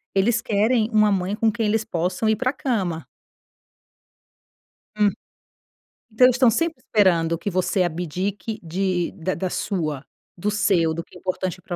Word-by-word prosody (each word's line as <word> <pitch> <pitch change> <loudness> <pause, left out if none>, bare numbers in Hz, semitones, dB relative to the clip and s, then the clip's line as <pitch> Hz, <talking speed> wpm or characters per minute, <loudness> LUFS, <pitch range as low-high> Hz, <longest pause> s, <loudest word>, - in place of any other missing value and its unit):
eles 225 +4 +2
querem 220 +1 +1
uma 215 -1 +4
mãe 190 +1 0
com 220 +1 +2
quem 225 +1 -2
eles 220 +1 +1
possam 180 +2 -1
ir 220 - +3
pra 255 +4 -1
cama. 195 - -2 1.9
Hum. 210 -1 +4 1.0
Então 220 +4 +5
eles 250 -1 +5
estão 250 -1 +5
sempre 330 +8 0
esperando 170 -5 +2
que 175 - -3
você 185 +1 +1
abdique 180 +6 -3
de 180 +1 -1
da 180 +2 -3
da 185 - -2
sua 155 -8 -2 0.3
do 200 +4 -1
seu, 195 -6 +2
do 170 +1 -4
que - - -16
é - - -14
importante 185 0 -3
pra 185 -4 -5
195 Hz, 160 wpm, -23 LUFS, 175-220 Hz, 1.9 s, Então